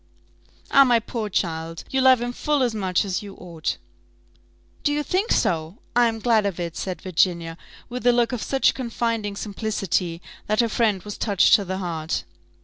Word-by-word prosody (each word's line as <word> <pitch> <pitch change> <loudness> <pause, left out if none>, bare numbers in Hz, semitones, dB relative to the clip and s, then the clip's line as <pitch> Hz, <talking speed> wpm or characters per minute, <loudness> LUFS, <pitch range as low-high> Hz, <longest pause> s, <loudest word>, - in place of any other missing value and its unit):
"Ah, 275 - +8
my 245 -3 +4
poor 225 -1 -4
child! 165 -3 -2
you 265 - +2
love 260 -2 +6
him 245 0 -3
full 295 +1 0
as 240 -3 0
much 190 -3 0
as 190 -2 -2
you 200 -2 -10
ought." 170 -3 -4 1.1
"Do 290 - +2
you 295 0 0
think 380 - 0
so? 160 +3 0 0.2
I 240 0 +5
am 225 -1 -2
glad 225 -1 +2
of 185 -3 -4
it," 170 -1 -4
said 185 0 -5
Virginia, 170 -2 +1 0.3
with 250 0 -3
a - - +8
look 240 -1 +2
of 245 -3 -3
such 270 -1 +2
confiding 230 -4 -2
simplicity, 195 -5 -2 0.3
that 215 +1 0
her 235 -1 +3
friend 215 -4 +1
was 205 -1 -7
touched 200 -4 +3
to 200 - +5
the 190 +1 -3
heart. 165 -4 -3
210 Hz, 185 wpm, -23 LUFS, 180-240 Hz, 1.1 s, Ah